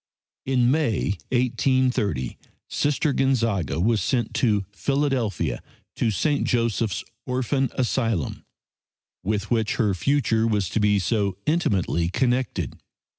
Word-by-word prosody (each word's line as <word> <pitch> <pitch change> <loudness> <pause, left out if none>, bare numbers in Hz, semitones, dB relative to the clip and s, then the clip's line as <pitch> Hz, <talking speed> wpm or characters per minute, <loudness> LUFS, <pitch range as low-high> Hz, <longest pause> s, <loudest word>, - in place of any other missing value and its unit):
In 125 -2 +3
May, 145 -11 +1 0.2
1830, 125 - +1 0.3
Sister 145 0 0
Gonzaga 115 -12 +1
was 110 +4 +2
sent 120 -4 0
to 105 -5 +1
Philadelphia 135 - -1 0.4
to 115 - +2
St. 145 - +1
Joseph's 115 -4 0 0.2
Orphan 130 +1 0
Asylum, 115 - -1 0.8
with 105 +2 -2
which 110 -3 +1
her 105 -5 +2
future 115 0 +1
was 105 -5 0
to - - -1
be 105 -1 +3
so 100 -1 0
intimately 95 - +1
connected. 125 +4 -1
115 Hz, 110 wpm, -24 LUFS, 105-130 Hz, 0.8 s, In